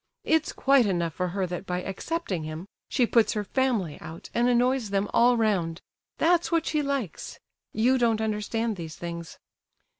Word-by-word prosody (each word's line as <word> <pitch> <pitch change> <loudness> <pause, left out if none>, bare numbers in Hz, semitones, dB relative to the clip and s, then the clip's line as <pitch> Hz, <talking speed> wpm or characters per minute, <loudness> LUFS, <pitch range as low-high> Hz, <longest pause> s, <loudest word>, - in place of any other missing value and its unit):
It's 320 -1 +2
quite 270 -4 +4
enough 170 -4 0
for 180 +3 -1
her 190 +2 -1
that 180 +2 -6
by 180 0 -2
accepting 195 - -3
him 155 +4 -6 0.2
she 250 - +2
puts 230 -1 +3
her 210 - -1
family 215 - 0
out 165 +1 -9
and 240 +1 +2
annoys 250 -1 +2
them 200 +1 0
all 240 +1 +5
round—that's 215 - 0
what 330 -1 +2
she 305 -1 0
likes. 275 - -3 0.3
You 250 +4 +2
don't 230 -2 +2
understand 220 0 -1
these 160 -2 -7
things." 170 -1 -7
215 Hz, 160 wpm, -27 LUFS, 180-255 Hz, 0.3 s, all